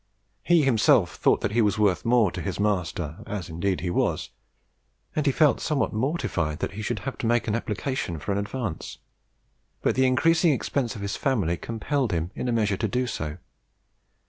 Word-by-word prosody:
He 170 -3 +4
himself 120 -6 +4
thought - - +2
that 105 - -1
he 115 +2 +3
was 105 -2 +2
worth 100 -6 +2
more 115 -5 +4
to 90 - -5
his 95 +2 -4
master 90 -6 -1
as 100 -5 -4
indeed 85 +2 -1
he 90 0 -2
was, - - 0 0.8
and 150 -1 0
he - - +5
felt 150 +2 +3
somewhat 150 -3 0
mortified 110 - -1
that - - -3
he 105 +2 -6
should 105 - -2
have 135 - -4
to 115 - -1
make 120 0 +2
an 105 - 0
application 110 - -2
for 75 +6 -4
an 100 - +1
advance; 100 -4 -4 0.9
but - - +3
the 130 0 +3
increasing 165 +5 +4
expenses 130 -2 -1
of 100 - -6
his 100 - -2
family 105 - +1
compelled 115 - -2
him 85 +1 -1
in 125 - -4
a - - +1
measure 105 -4 +1
to 110 - 0
do 125 +5 0
so. 75 -9 -4
110 Hz, 195 wpm, -26 LUFS, 90-130 Hz, 0.9 s, he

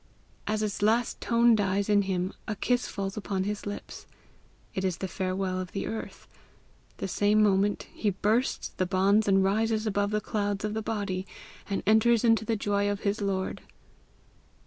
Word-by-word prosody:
As 215 +1 0
its 205 -2 -3
last 225 +3 +1
tone 235 0 +4
dies 200 -2 +1
in 205 -1 +4
him, 190 -1 -2
a 215 - -2
kiss 245 +4 0
falls 195 -2 -4
upon 195 -2 -2
his 205 +1 -4
lips. 205 - -7 0.7
It 190 - -2
is 185 -3 0
the 190 - -3
farewell 185 0 -2
of 185 -1 -6
the 195 - -2
earth; 220 - -6 0.7
the - - -3
same 205 +3 +3
moment 200 0 +2
he 210 - 0
bursts 215 +6 0
the 185 - -2
bonds 200 +3 +3
and 195 -1 +4
rises 220 +3 +1
above 205 -1 0
the 210 0 0
clouds 205 -1 -2
of 210 - -2
the 220 - -2
body, 200 -4 -3 0.4
and 200 - -2
enters 220 +2 +4
into 225 -2 +4
the 225 - 0
joy 205 -1 0
of 205 0 -2
his 205 +1 -1
Lord." 190 -2 -2
205 Hz, 175 wpm, -28 LUFS, 195-215 Hz, 0.7 s, tone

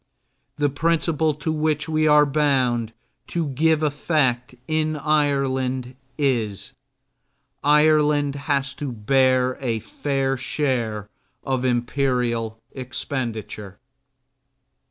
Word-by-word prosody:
The 145 -1 +1
principle 160 +1 +1
to 150 +2 -3
which 155 -1 0
we 155 -1 +1
are 150 0 +6
bound 130 -6 +1 0.4
to 165 -4 -2
give 155 +3 +2
effect 140 -5 0
in 155 0 0
Ireland 135 -4 0 0.2
is: 120 -5 -1 0.9
Ireland 150 -1 +4
has 140 -1 -1
to 145 -3 -4
bear 130 +3 +2
a 120 -4 -1
fair 135 +3 -2
share 120 -6 -2 0.4
of 130 -2 -1
imperial 120 -2 0
expenditure. 115 -6 -5
135 Hz, 95 wpm, -23 LUFS, 125-150 Hz, 0.9 s, are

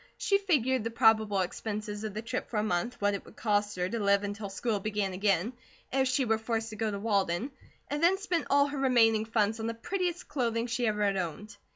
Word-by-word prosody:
She 395 -1 +2
figured 260 - +1
the 230 - -2
probable 220 -4 +3
expenses 210 +3 -4
of 215 -2 -5
the 215 - -4
trip 240 +3 -4
for 225 - -3
a 210 - +2
month, 215 +4 -1
what 205 0 +2
it 200 - -4
would - - -16
cost 210 -1 0
her 180 0 -1
to 230 +4 -3
live 200 -1 +3
until 205 0 -4
school 210 +2 -1
began 205 -1 -2
again, 195 +3 +1 0.4
if 265 0 +3
she 255 +1 +1
were 225 -1 +1
forced 225 0 -2
to - - -7
go 220 +1 -1
to 200 - -3
Walden, 200 +2 0 0.4
and 290 +1 -3
then 355 +3 +4
spent 360 -4 -2
all 280 0 +5
her 285 -1 -4
remaining 225 -5 +4
funds 220 0 +1
on 225 - -2
the 230 - -3
prettiest 355 +6 -3
clothing 235 -5 -1
she 240 +1 -1
had 215 -2 +1
ever 200 -2 +1
owned. 195 +5 -5
220 Hz, 230 wpm, -30 LUFS, 205-250 Hz, 0.4 s, all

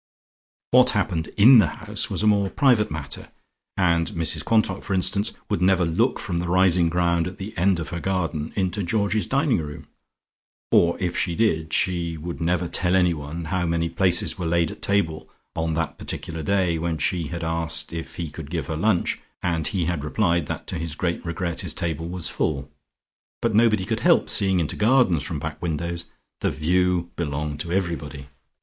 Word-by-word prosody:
What 125 0 +6
happened 90 -5 -1
in 120 +4 +8
the 105 - +5
house - - -4
was - - -1
a - - +3
more 100 -2 +3
private 125 -6 +3
matter, 75 -2 -6 0.5
and 85 -3 +2
Mrs 80 -2 0
Quantock, 110 -4 +1
for 100 - -2
instance, 100 +3 +2 0.2
would - - -1
never 90 -1 +3
look 80 0 +1
from 85 - -3
the 90 +1 -2
rising 90 -1 +4
ground 85 0 +1
at 90 +1 -8
the 105 +3 -7
end 90 0 +2
of 80 - -5
her 85 - -4
garden 85 -5 -2
into 95 +1 -1
Georgie's 100 +3 0
dining 135 - +2
room 75 -2 -7 0.9
or, 85 0 +4
if 90 -3 -2
she 85 -3 0
did 80 -8 +1
she 85 -2 +1
would 85 +2 -6
never 90 +1 0
tell 90 +2 +1
anyone 85 -3 0
how 90 -2 0
many 85 0 0
places 95 +1 +1
were 85 - -2
laid 85 0 +1
at - - -11
table 85 -6 0 0.3
on 80 -1 -1
that 80 -3 -3
particular 80 -1 -4
day 90 -1 +1
when 85 0 -2
she 85 0 -1
had 85 +1 -5
asked 80 0 0
if 80 -1 -6
he 85 -3 -5
could 75 -1 -8
give 80 -4 -3
her 80 - -4
lunch, 90 +3 +1 0.2
and 80 -3 0
he 90 -5 -1
had 85 -3 -2
replied 85 -1 +1
that - - -5
to 90 - -3
his 80 -2 -4
great 85 0 -2
regret 85 0 -3
his - - -3
table 80 0 -3
was 90 -2 -3
full. 70 -2 -2 0.7
But 115 -2 0
nobody 110 -3 +3
could - - -2
help - - +3
seeing 95 -2 +3
into 80 - -1
gardens 110 - +3
from - - -4
back - - -6
windows: 85 +1 -3 0.3
the - - 0
"view" 90 +2 +1
belonged 75 -2 -3
to 85 - -4
everybody. 80 -7 -3
85 Hz, 190 wpm, -24 LUFS, 80-95 Hz, 0.9 s, in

